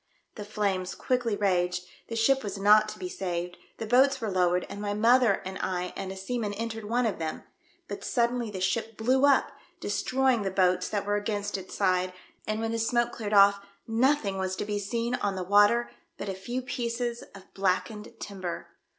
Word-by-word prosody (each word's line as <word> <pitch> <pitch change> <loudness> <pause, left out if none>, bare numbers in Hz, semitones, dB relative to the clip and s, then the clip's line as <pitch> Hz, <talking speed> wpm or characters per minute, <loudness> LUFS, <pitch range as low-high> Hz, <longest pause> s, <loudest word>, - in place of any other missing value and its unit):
The 210 - -7
flames 200 -3 -1
quickly 245 -4 0
raged, 180 -3 0 0.2
the 230 - -5
ship 265 +4 +3
was 200 -1 -4
not 210 +2 +5
to 215 - -8
be 365 - -5
saved, 180 - -4 0.2
the 225 - -4
boats 265 +4 +4
were 220 -4 -3
lowered 180 -1 +2
and 205 - -7
my 205 0 -2
mother 230 -1 +4
and 190 0 -5
I 180 -1 -2
and 190 - -5
a 190 - -7
seaman 210 +2 -3
entered 225 0 -4
one 240 +3 +1
of 210 -6 -1
them, 160 -1 -4 0.4
but - - -6
suddenly 240 -1 0
the 190 -3 -6
ship 220 +3 -1
blew 260 +5 +3
up, 280 - +3 0.3
destroying 255 +4 +1
the 195 - -1
boats 180 -1 +2
that 205 -1 -2
were 205 0 +1
ao - - -11
ainst 205 0 -2
its 190 -1 -6
side, 185 -2 +1 0.3
and 215 0 -1
when 225 0 -1
the 230 - -1
smoke 240 +1 +1
cleared 215 -3 -5
oft" 200 0 +6 0.2
nothing 225 -4 +1
was 190 0 -1
to - - -3
be 205 0 -2
seen 230 +4 -2
on 205 -5 -1
the 185 -1 -4
vv^ater 205 +5 +4 0.3
but 205 - -6
a - - -2
few 240 +7 -4
pieces 240 -1 -3
of 195 -1 -15
blackened 200 +3 -1
timber. 185 -4 -6
210 Hz, 200 wpm, -28 LUFS, 190-235 Hz, 0.4 s, oft